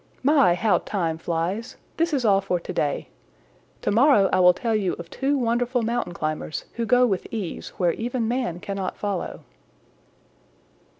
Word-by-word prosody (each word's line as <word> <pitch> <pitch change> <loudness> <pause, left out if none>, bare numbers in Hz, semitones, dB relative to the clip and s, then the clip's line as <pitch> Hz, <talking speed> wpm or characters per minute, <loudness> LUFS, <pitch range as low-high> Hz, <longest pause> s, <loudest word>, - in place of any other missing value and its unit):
"My, 275 - +5
how 200 -1 +2
time 165 -5 -2
flies! 175 +8 -3 0.2
This 335 +1 +1
is 270 -5 0
all 195 -2 +4
for 180 -2 -1
to - - -7
day. 145 -2 -1 0.7
To - - +1
morrow 220 -4 +5
I - - +4
will 180 -1 +6
tell 230 +2 -1
you 195 -4 0
of 170 0 -9
two 280 +1 0
wonderful 245 0 0
mountain 230 -6 -2
climbers 155 0 -3
who 235 -1 -3
go 250 +1 +5
with 195 -6 -1
ease 205 -7 -5
where 175 -3 +2
even 240 0 -2
man 240 -8 -1
cannot 195 -2 -4
follow." 200 -3 -3
205 Hz, 165 wpm, -24 LUFS, 175-245 Hz, 0.7 s, will